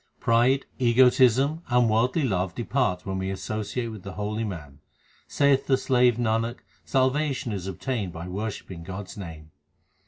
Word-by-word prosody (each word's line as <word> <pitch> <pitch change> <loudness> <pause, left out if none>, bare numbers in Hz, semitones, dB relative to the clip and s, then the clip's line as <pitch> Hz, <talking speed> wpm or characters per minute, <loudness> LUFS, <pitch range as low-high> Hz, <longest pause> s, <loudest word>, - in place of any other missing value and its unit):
Pride, 120 +4 +3
egotism, 130 +4 +4
and 125 -1 +4
worldly 120 +8 +2
love 95 -6 -1
depart 120 -6 -1
when 95 -1 -3
we 95 0 -2
associate 105 +5 -3
with 110 -3 -8
the 95 0 -8
holy 105 +2 -3
man. 80 -9 -7 0.5
Saiththe 135 -1 +3
slave 125 -3 +3
Nanak, 115 0 -1 0.2
salvation 130 -1 0
is 95 -2 -4
obtained 100 +1 -3
by 85 +1 -7
worshipping 95 -2 -5
God 95 +4 -6
s - - -11
name. 80 -5 -9
110 Hz, 145 wpm, -26 LUFS, 95-130 Hz, 0.5 s, egotism